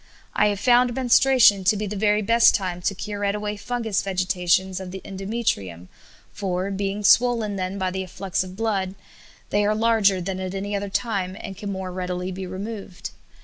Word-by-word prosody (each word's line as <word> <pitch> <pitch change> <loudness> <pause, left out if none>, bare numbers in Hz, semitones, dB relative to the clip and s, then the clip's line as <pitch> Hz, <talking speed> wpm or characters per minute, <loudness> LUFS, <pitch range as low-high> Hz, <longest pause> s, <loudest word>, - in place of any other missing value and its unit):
I - - +3
have 205 -2 -1
found 245 +1 +4
menstruation 250 -5 +5
to 205 +3 +4
be 210 - -2
the 210 +1 -4
very 210 +1 +2
best 230 +3 +5
time 180 -3 -3
to 195 +3 -1
curette 205 +1 -2
away 210 0 -3
fungous 225 -1 -2
vegetations 185 -1 0
of 190 -1 -7
the 190 +1 -7
endometrium, 190 - -3 0.4
for, 190 -1 -2
being 200 +1 -3
swollen 225 -1 +4
then 185 +1 -3
by 185 -1 -1
the 190 +1 -3
afflux 185 0 -3
of 185 0 -10
blood, 195 -3 -1 0.6
they 205 0 +2
are 210 +1 +2
larger 215 -4 +3
than 185 +1 -4
at 185 0 -4
any 200 +1 -3
other 200 0 -3
time, 195 -3 -2
and 195 - -7
can 200 +2 -6
the - - -2
more 190 -1 -5
readily 180 0 -3
be 185 0 -6
removed. 190 - -7
195 Hz, 190 wpm, -23 LUFS, 185-210 Hz, 0.6 s, menstruation